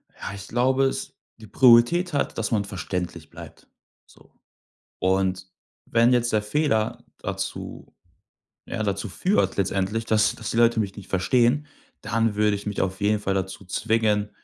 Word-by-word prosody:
Ja, - - -7
ich 100 0 -9
glaube, 130 +3 +2
es 135 - -3 0.3
die 110 - -12
Priorität 130 - +5
hat, 140 - -1
dass 115 - -2
man 105 -3 +1
verständlich 90 -5 -5
bleibt, - - -13 0.4
so. - - -22 0.7
Und, 95 0 0 0.4
wenn 115 +2 +4
jetzt 120 -1 +1
der 105 -1 +2
Fehler 110 -1 0
dazu, - - -6 0.8
ja, 110 - -3
dazu 100 +1 -2
führt 190 - 0
letztendlich, 100 +3 -1
dass 110 -1 +2
dass 110 -3 -5
die - - -3
Leute 115 -1 +4
mich 100 -2 -2
nicht 100 - -11
verstehen, 120 +9 +2 0.4
dann 115 -1 0
würde 105 0 +2
ich 100 - -7
mich 105 - -3
auf 95 0 -3
jeden 105 +1 +2
Fall 100 -1 -1
dazu 95 +1 -4
zwingen, 105 +1 0
105 Hz, 160 wpm, -24 LUFS, 95-120 Hz, 0.8 s, Priorität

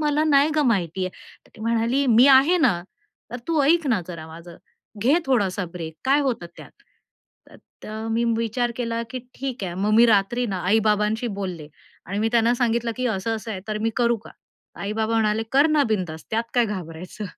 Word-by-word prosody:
मला 300 0 +1
नाही 290 0 +4
गं 295 -3 +3
माहिती 185 -3 0
आहे. - - -5 0.4
तर - - -25
ती - - -14
म्हणाली 230 +4 +1
"मी 240 +3 +6
आहे 275 +7 +6
ना. 205 - +2 0.5
तर 245 - -4
तू 320 -3 +2
ऐक 325 +2 +3
ना, 225 -6 +2
जरा 160 -2 -7
माझं. 170 +1 -12 0.5
घे 270 +6 +4
थोडासा 200 -7 +1
ब्रेक 165 -3 -7
काय 275 +2 +3
होतात 240 -11 -2
त्यात?" - - -15 1.0
तर 220 +1 -6
मी 230 +1 +1
विचार 230 +1 -1
केला, 230 -1 -2
की 255 - -4 0.2
ठीक 260 -6 -5
आहे. 175 -2 -4
मग 210 - +1
मी 235 +1 +7
रात्री 225 +3 +2
ना 190 -3 -3
आई-बाबांशी 215 +2 +2
बोलले 170 -6 -5 0.4
आणि 200 +3 -3
मी 220 - +1
त्यांना 235 +1 +3
सांगितलं 235 -1 0
की 255 0 -1
असं-असं 220 +1 -2
आहे 190 -3 -4
तर 215 - -2
मी 225 - +1
करू 235 -1 +2
का? - - -12 0.5
आई 200 +1 -3
बाबा 220 +1 -1
म्हणाले, 220 0 +1
"कर 280 +3 +5
ना 305 -2 +3
बिंदास 175 -7 -3
त्यात 225 +1 0
काय 245 - +4
घाबरायचं." 180 +1 -7
225 Hz, 195 wpm, -23 LUFS, 195-250 Hz, 1.0 s, मी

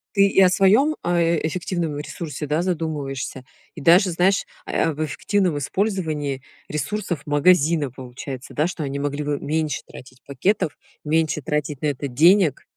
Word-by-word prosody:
Ты 200 0 +6
и 195 - +2
о 185 - +7
своём, 215 +12 +4
а, 175 0 +1
эффективном 165 -1 -1
ресурсе, 150 -1 -6
да, 150 +3 0
задумываешься, 150 -7 -3 0.3
и - - -9
даже, 180 +5 +5
знаешь, 185 +3 +2 0.2
а, - - -6
э, - - 0
об 155 -1 -1
эффективном 180 +2 0
использовании 155 -6 -2 0.3
ресурсов 155 +1 -3
магазина, 150 0 +3
получается, 130 +1 -8
да, 150 +3 +1
что 170 -3 -5
они 140 0 -3
могли 145 +1 -2
бы 145 -1 -2
меньше 155 0 -1
тратить 130 0 -13
пакетов, 150 +4 0 0.3
меньше 155 0 +1
тратить 150 0 -2
на 150 - 0
это 140 0 -2
денег. 160 +4 +4
155 Hz, 155 wpm, -22 LUFS, 145-180 Hz, 0.3 s, о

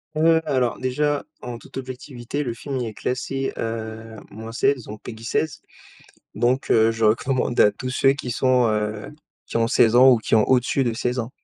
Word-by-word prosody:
Heu, 160 +1 +4
alors, 125 -3 0
déjà 145 +3 0 0.2
en 120 -1 -6
toute - - -12
objectivité, 130 +1 -6
le 120 -4 -3
film 135 +3 -5
il 120 -2 -2
est 110 - -7
classé, 135 +3 -3
heu, 110 0 -5 0.2
-16 115 +4 -1
donc 105 0 -9
PEGI 110 -1 -9
16 145 +6 -2 0.7
donc 120 +5 0
heu, 110 0 +5
je 115 0 -1
recommande 120 +3 +1
à 105 - +7
tous 125 +5 -6
ceux 135 +1 +3
qui 130 -3 -6
sont, 125 0 +3
heu, 105 0 -2 0.4
qui - - -4
ont 115 0 +2
16 115 -3 +4
ans 130 +2 +8
ou 125 - +5
qui 110 - -1
ont 110 -1 +5
au-dessus 130 +1 +2
de 120 -3 -1
16 125 +1 -1
ans 115 +1 -6
120 Hz, 195 wpm, -23 LUFS, 115-130 Hz, 0.7 s, ans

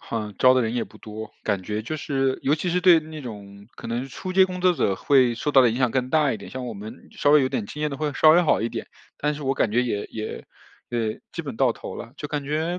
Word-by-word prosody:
哼， 105 -3 -5
招 130 0 +6
的 130 - +3
人 115 +1 -2
也 120 - 0
不 - - -17
多， 110 0 -8
感 100 -3 0
觉 105 +3 -3
就 155 +7 -4
是 135 -3 -1
尤 145 +3 +3
其 175 +3 -3
是 180 +1 +1
对 175 -3 +7
那 155 -1 -9
种 100 -4 -10
可 - - -8
能 120 +3 -2
初 185 +7 -6
阶 190 0 +7
工 180 -1 -6
作 180 0 +4
者 100 -10 +1
会 130 0 +3
受 145 +5 -2
到 135 - +7
的 120 - +4
影 120 - -3
响 125 -3 +2
更 130 0 -1
大 150 -3 +3
一 - - -3
点。 - - -11
像 130 -1 -5
我 115 - -5
们 110 +5 -10
稍 145 - +1
微 150 -1 +7
有 130 - +1
点 110 - -2
经 150 - -8
验 150 - 0
的 140 - -5
会 150 -1 -2
稍 155 - +5
微 175 +2 +6
好 155 - +2
一 115 - 0
点， - - -6 0.3
但 150 0 0
是 150 - -8
我 135 0 0
感 110 - 0
觉 125 +2 +3
也 105 -4 -2
也 110 -1 -6 0.4
呃， 115 -2 -1 0.2
基 165 - -4
本 140 -6 -6
到 130 -3 +3
头 - - -8
了， 115 - -9
就 150 - -6
感 145 -2 -3
觉， 160 +5 -1
130 Hz, 310 characters per minute, -24 LUFS, 115-150 Hz, 0.4 s, 对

